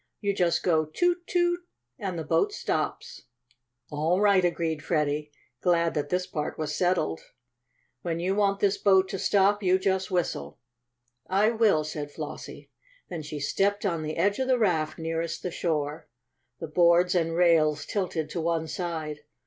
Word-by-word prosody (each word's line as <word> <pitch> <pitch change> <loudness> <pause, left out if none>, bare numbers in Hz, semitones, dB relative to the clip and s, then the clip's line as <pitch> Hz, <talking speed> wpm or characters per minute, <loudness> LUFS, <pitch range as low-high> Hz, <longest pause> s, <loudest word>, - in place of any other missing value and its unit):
You 200 -1 0
just 175 -3 +1
go 160 -3 +2
'Toot! 350 - 0
Toot!' 350 0 +1 0.4
and 190 -4 -3
the 160 - -3
boat 410 - +1
stops." - - -3 0.7
"All 160 +5 +1
right," 200 -2 +4
agreed 165 -3 -1
Freddie, 150 -2 0 0.3
glad 170 -2 +2
that 145 -2 -2
this 180 0 0
part 150 -4 -4
was 155 -1 -3
settled. 175 - 0 0.8
"When 165 +2 -2
you 185 +3 0
want 200 -1 +1
this 200 0 +2
boat 190 -2 +4
to 195 -1 -4
stop, 205 +2 +3
you 185 -1 +3
just 190 0 0
whistle." 170 - -2 0.7
"I 200 +4 +3
will," 220 -9 +3
said 150 -1 -5
Flossie. - - -8 0.4
Then 170 -3 -5
she 150 0 -6
stepped 200 +8 0
on 170 -5 0
the 155 0 -4
edge 200 +3 +1
of 260 - 0
the 260 -1 +3
raft 170 -9 +1
nearest 165 0 -3
the 180 - -3
shore. 155 -2 -2 0.5
The 165 - -5
boards 175 +2 +4
and 165 -2 +1
rails 155 -3 +3
tilted 180 -6 -2
to 170 - -2
one 165 -1 0
side. 160 -3 -4
175 Hz, 165 wpm, -27 LUFS, 155-195 Hz, 0.8 s, right